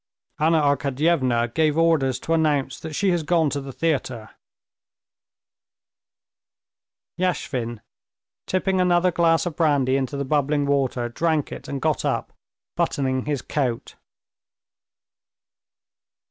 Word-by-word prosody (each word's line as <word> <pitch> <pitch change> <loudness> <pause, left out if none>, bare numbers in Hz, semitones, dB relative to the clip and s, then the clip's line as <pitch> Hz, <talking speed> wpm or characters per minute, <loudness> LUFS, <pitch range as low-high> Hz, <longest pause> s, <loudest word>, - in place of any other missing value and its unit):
"Anna 160 +1 +3
Arkadyevna 140 -4 +1
gave 155 -1 +2
orders 150 -6 +2
to 165 - -1
announce 150 -4 +1
that 160 -1 -7
she 195 +5 +1
has 175 -2 +1
gone 160 -1 +1
to 140 - -2
the 135 0 -7
theater." 130 -7 -2 2.9
Yashvin, 125 -11 -2 0.7
tipping 185 0 +1
another 180 0 +3
glass 165 -1 +2
of 170 -3 -4
brandy 140 -5 +2
into 135 +1 -3
the 140 - -2
bubbling 145 +1 +1
water, 135 -4 0
drank 155 +4 -1
it - - -8
and 140 - -4
got 155 +1 0
up, - - -2 0.4
buttoning 130 -2 0
his 145 -3 -2
coat. 125 -6 -2
145 Hz, 115 wpm, -23 LUFS, 130-165 Hz, 2.9 s, Anna